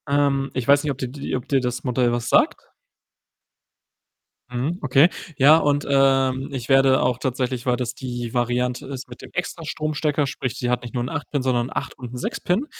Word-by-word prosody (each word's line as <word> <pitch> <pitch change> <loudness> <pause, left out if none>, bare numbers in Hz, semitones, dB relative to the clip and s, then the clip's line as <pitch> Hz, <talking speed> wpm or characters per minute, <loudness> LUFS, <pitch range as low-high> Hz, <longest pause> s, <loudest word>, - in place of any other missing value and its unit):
Ähm, 140 -1 +1
ich 130 -2 -3
weiß 145 +1 +5
nicht, 150 - 0
ob 135 - -5
dir 130 - -3
die 140 +1 -4
ob 125 - -5
dir 135 - +2
das 125 -1 -3
Modell 125 -1 +1
was 120 -1 -2
sagt? - - +2 1.8
Mhm, 130 +9 -2
okay. 145 +3 +5 0.3
Ja 145 +4 +7
und, 145 -2 +1
ähm, 135 -1 +3
ich 130 -4 -5
werde 135 -1 +5
auch 125 -1 +1
tatsächlich, 130 -1 -2
weil 125 -1 +2
das 120 -2 -3
die 120 -2 -5
Variante 125 +2 0
ist 135 -1 -6
mit 120 - -11
dem - - -10
extra 180 -1 -3
Stromstecker, 150 -1 -1
sprich, 130 -2 -4
sie 120 - -2
hat 125 - +1
nicht 120 - -9
nur 120 -2 -1
'n 125 - -4
8- 150 -2 -5
Pin, 145 - 0
sondern 125 -2 +1
'n - - -14
8- - - -4
und 125 -1 -8
'n - - -5
6- - - -4
Pin 190 +10 0
130 Hz, 215 wpm, -23 LUFS, 125-140 Hz, 1.8 s, Ja